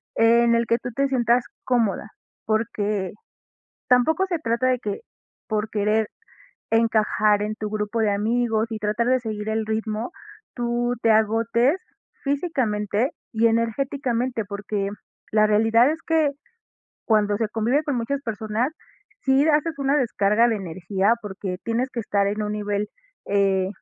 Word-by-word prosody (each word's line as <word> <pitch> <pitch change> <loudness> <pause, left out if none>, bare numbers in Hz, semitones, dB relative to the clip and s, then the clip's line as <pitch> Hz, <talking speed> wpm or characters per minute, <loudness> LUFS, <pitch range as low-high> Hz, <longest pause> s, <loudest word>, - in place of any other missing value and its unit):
en 235 +1 +4
el 230 0 +2
que 230 - +3
tú 245 - -6
te 275 +2 +2
sientas 240 -2 +2 0.2
cómoda, 225 -4 0 0.4
porque 210 -3 -1 0.8
tampoco 315 +9 +4
se 345 -3 -1
trata 235 -3 0
de 255 -1 +2
que 210 -4 -4 0.5
por 215 -1 -1
querer 215 +1 +1 0.6
encajar 215 -2 +3
en 215 +1 -3
tu 215 -1 -4
grupo 210 +2 -2
de 210 -2 +2
amigos 225 +2 +1
y 220 - -2
tratar 215 +3 0
de 255 +1 +3
seguir 215 -2 -5
el 220 0 -1
ritmo, 220 +3 -2 0.4
tú 240 0 -1
te 225 - +4
agotes 230 - +3 0.5
físicamente 255 - 0 0.2
y 230 0 +3
energéticamente, 240 +1 -1
porque 200 0 -3 0.4
la 215 0 +4
realidad 225 +4 +4
es 320 +1 -5
que 315 -3 +2 0.7
cuando 210 -2 +2
se 220 -1 -1
convive 230 +7 +1
con 285 -4 -1
muchas 275 +4 -2
personas, 220 +3 -2 0.5
sí 270 +2 +4
haces 305 +1 +1
una 275 +1 +2
descarga 230 -1 +2
de 225 - +1
energía, 190 +3 0
porque 190 -3 -5
tienes 240 +3 -1
que 240 - -3
estar 200 -2 +1
en 210 +2 -2
un 210 0 -2
nivel, 205 0 -2 0.4
eh, 195 -2 +2
225 Hz, 145 wpm, -23 LUFS, 210-245 Hz, 0.8 s, en